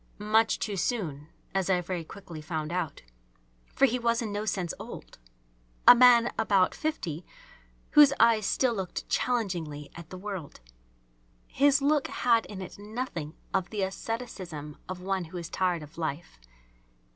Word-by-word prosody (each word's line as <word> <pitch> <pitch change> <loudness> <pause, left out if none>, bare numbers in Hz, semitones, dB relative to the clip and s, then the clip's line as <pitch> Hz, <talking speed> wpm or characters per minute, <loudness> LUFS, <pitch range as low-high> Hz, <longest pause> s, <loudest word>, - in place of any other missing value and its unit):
Much 220 +2 +3
too 205 - -3
soon, 170 - -2 0.3
as 195 -1 0
I 185 -1 +3
very 180 -1 -4
quickly 170 -2 -10
found 155 0 -4
out. 170 - -3 0.7
For 275 - +6
he 250 -1 0
was 235 0 +1
in 225 -4 -3
no 205 +1 -3
sense 185 -5 -1
old. - - -10 0.7
A - - +13
man 240 -1 +6
about 200 -4 +3
fifty 185 - -3 0.7
whose 295 -2 +8
eyes 220 -4 +5
still 255 -3 +2
looked 190 -4 -4
challengingly 175 - -1
at 170 -1 -11
the 185 - -8
world. 190 -6 -6 0.9
His 280 +1 +3
look 290 0 +3
had 230 -2 +2
in 190 -2 -7
it 185 - -10
nothing 205 - -5 0.2
of 190 -2 0
the 210 -3 -2
asceticism 190 -8 -5
of 185 -1 -5
one 190 -1 -1
who 165 +3 -8
is 170 -2 -6
tired 180 -4 0
of 150 +3 -12
life. 160 - -4
190 Hz, 155 wpm, -28 LUFS, 170-230 Hz, 0.9 s, A